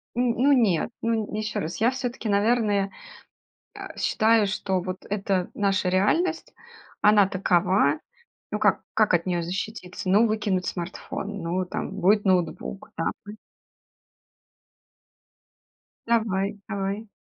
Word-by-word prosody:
Н 245 - +1 0.2
ну 285 - +5
нет, 220 - +2
ну 230 0 +1 0.2
н - - -9
ещё 215 0 -2
раз: 160 +3 -4
я 240 +3 +4
всё-таки, 250 -3 -4
наверное, 205 -1 +2 0.8
э, - - -9
считаю, 220 -2 +3
что 190 -2 -1
вот 185 +1 -6
это 195 -3 -1
наша 195 -2 +1
реальность, 320 - +1 0.5
она 210 -2 +6
такова. 180 -5 +2 0.5
Ну, - - -2
как - - +2
как 215 -4 +3
от 170 - +2
неё 175 -2 0
защититься? 185 +1 -5
Ну, 215 +4 +5
выкинуть 205 -4 0
смартфон, 195 +2 -5
ну, 180 +2 -1
там 180 - -4
будет 205 +4 +3
ноутбук, 185 +1 -1
да. 165 - -1 0.2
М. 210 +1 -8 2.7
Давай, 205 -3 +1
давай. 200 +2 -3
200 Hz, 125 wpm, -25 LUFS, 185-220 Hz, 2.7 s, она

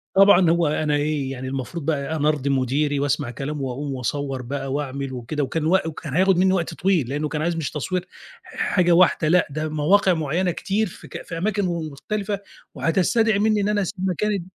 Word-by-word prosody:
طبعًا، 190 -3 +6
هو 170 -1 +3
أنا 150 0 0
إيه 145 -2 -1
يعني 130 0 -6
المفروض 135 +4 -5
بقى 155 0 -1
أنا 150 -1 +1
أرضيّ 140 -2 -1
مديري 140 +2 +1
وأسمع 145 -2 -1
كلامه 140 +4 -5
وأقوم 135 +2 -3
وأصوّر 135 +2 -3
بقى 135 +1 -4
وأعمل 140 -2 -3
وكده، 130 +4 -3
وكان 155 +3 -2
و 185 +4 +4
وكان 155 -3 -6
هياخد 185 +1 +3
مني 190 +1 +4
وقت 175 -3 -1
طويل 175 -10 +1
لأنه 150 +2 -1
كان 150 -1 -3
عايز 170 +1 0
مش 155 -5 -3
تصوير 180 +6 -3 0.4
حاجة 175 -2 0
واحدة، 170 -2 +4
لأ، 175 +2 +4
ده 155 +2 -3
مواقع 180 +5 +3
معيّنة 165 +3 0
كتير 205 +5 -1
في - - -12
ك - - -7
في 165 - -6
أماكن 200 +2 0
م - - 0 0.2
مختلفة 200 +7 -3 0.4
وهتستدعي 200 +5 +2
مني 215 -1 +2
إن 205 - 0
أنا 205 -1 +1
أسيب 190 0 -2
مكاني 200 +1 -1
155 Hz, 200 wpm, -23 LUFS, 140-185 Hz, 0.4 s, طبعًا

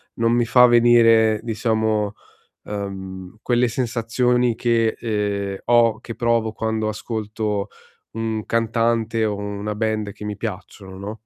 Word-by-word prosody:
non 115 0 +1
mi 120 0 +2
fa 125 +1 +6
venire, 115 -2 +5
diciamo, 110 -2 0 0.5
ehm, 95 -1 -7
quelle 120 0 +2
sensazioni 120 0 0
che, 115 -1 +1
ehm, 100 -3 -2
ho 120 -2 +4
che 115 - -8
provo 115 -2 0
quando 110 -1 -2
ascolto 105 -1 -3 0.5
un 110 -1 -3
cantante 115 0 0
o 105 -1 -1
una 100 +1 -4
band 110 -1 -2
che 105 - -11
mi 105 -1 -4
piacciono, 95 -2 -7
no? 100 +3 -6
110 Hz, 130 wpm, -21 LUFS, 105-115 Hz, 0.5 s, fa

